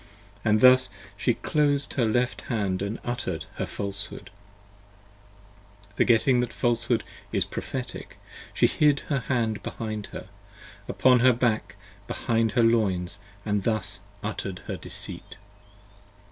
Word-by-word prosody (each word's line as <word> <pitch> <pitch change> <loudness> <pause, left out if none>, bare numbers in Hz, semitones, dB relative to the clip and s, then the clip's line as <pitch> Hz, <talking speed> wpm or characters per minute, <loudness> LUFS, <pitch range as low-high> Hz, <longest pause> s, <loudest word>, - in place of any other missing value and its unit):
And 110 0 +3
thus 130 -2 +7 0.3
she 120 +3 +1
closed 145 -2 +1
her 125 - +2
left 125 +3 0
hand 100 -6 0
and 100 +3 -2
utter'd 95 -9 -3
her - - -2
Falshood: 100 0 -5 1.5
20 100 0 -25
Forgetting 125 +2 +4
that 125 - 0
Falshood 120 -1 +1 0.3
is - - +1
prophetic, 125 -2 -6 0.3
she - - +3
hid 150 -2 +3
her 140 - +2
hand 115 -4 -1
behind 110 -2 -5
her, - - -8 0.6
Upon 125 -1 +4
her 125 +1 +6
back 115 -2 0 0.3
behind 115 -1 0
her 120 - +4
loins 100 -5 +2 0.2
& 100 - -26
thus 110 +1 0 0.2
utter'd - - -4
her - - -3
Deceit. - - -5
115 Hz, 125 wpm, -26 LUFS, 105-125 Hz, 1.5 s, thus